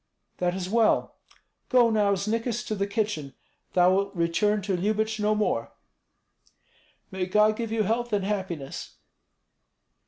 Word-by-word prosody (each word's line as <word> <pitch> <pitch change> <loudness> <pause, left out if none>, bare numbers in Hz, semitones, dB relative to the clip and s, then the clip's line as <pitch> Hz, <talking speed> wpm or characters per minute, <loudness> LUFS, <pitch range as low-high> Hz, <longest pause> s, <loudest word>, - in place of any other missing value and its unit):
That 180 0 0
is 185 -1 -3
well. 225 +2 +1 0.5
Go 240 -2 +5
now, 205 -2 +3
Znikis, 230 +4 -2
to 220 - -3
the 200 -1 -1
kitchen. 200 - -2 0.4
Thou 180 0 +5
wilt 200 +1 0
return 195 +5 +1
to 195 -1 0
Lyubich 215 +4 -1
no 210 +1 +2
more." 210 0 -1 1.4
"May 190 -1 -2
God 210 +3 +4
give 230 -1 -4
you 225 -1 +1
health 235 +3 -1
and 200 -2 0
happiness!" 185 -9 -4
210 Hz, 135 wpm, -26 LUFS, 185-220 Hz, 1.4 s, Go